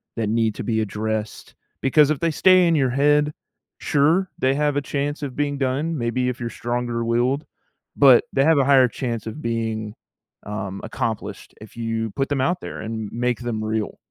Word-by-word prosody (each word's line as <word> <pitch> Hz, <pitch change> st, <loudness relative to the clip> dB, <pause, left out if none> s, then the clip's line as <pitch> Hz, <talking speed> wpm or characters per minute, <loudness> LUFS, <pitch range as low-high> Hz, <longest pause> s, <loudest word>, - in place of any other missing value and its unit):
that 110 Hz, -3 st, -1 dB
need 110 Hz, -1 st, +1 dB
to -, -, -5 dB
be 110 Hz, -2 st, 0 dB
addressed, 110 Hz, +1 st, -4 dB, 0.3 s
because 145 Hz, +2 st, +4 dB
if 155 Hz, -3 st, 0 dB
they 165 Hz, -1 st, +1 dB
stay 185 Hz, +3 st, +5 dB
in 170 Hz, -, +3 dB
your 135 Hz, -4 st, +2 dB
head, 145 Hz, +3 st, +2 dB, 0.4 s
sure, 160 Hz, +6 st, +2 dB
they 130 Hz, +1 st, +2 dB
have 145 Hz, 0 st, +1 dB
a -, -, +1 dB
chance 145 Hz, +2 st, -3 dB
of 135 Hz, -4 st, -5 dB
being 145 Hz, -1 st, -1 dB
done, 140 Hz, +5 st, -1 dB
maybe 125 Hz, +1 st, -1 dB
if 125 Hz, -, -5 dB
you're 120 Hz, -1 st, -3 dB
stronger 120 Hz, 0 st, -3 dB
willed, 125 Hz, +5 st, 0 dB, 0.5 s
but 135 Hz, -4 st, +7 dB
they 135 Hz, -, +3 dB
have 160 Hz, -1 st, +4 dB
a 140 Hz, -, +4 dB
higher 135 Hz, -2 st, +6 dB
chance 115 Hz, -2 st, -4 dB
of 130 Hz, +8 st, -6 dB
being, 110 Hz, -3 st, -3 dB, 0.5 s
um, 100 Hz, -2 st, -5 dB
accomplished 110 Hz, 0 st, -4 dB
if 110 Hz, -, -13 dB
you 115 Hz, -2 st, -2 dB
put 135 Hz, +5 st, -2 dB
them 140 Hz, -2 st, 0 dB
out 175 Hz, +6 st, 0 dB
there -, -, -7 dB
and 110 Hz, -1 st, -5 dB
m 115 Hz, -, -7 dB
make 125 Hz, -1 st, 0 dB
them 115 Hz, -3 st, -3 dB
real. 110 Hz, 0 st, -2 dB
125 Hz, 195 wpm, -22 LUFS, 115-145 Hz, 0.5 s, but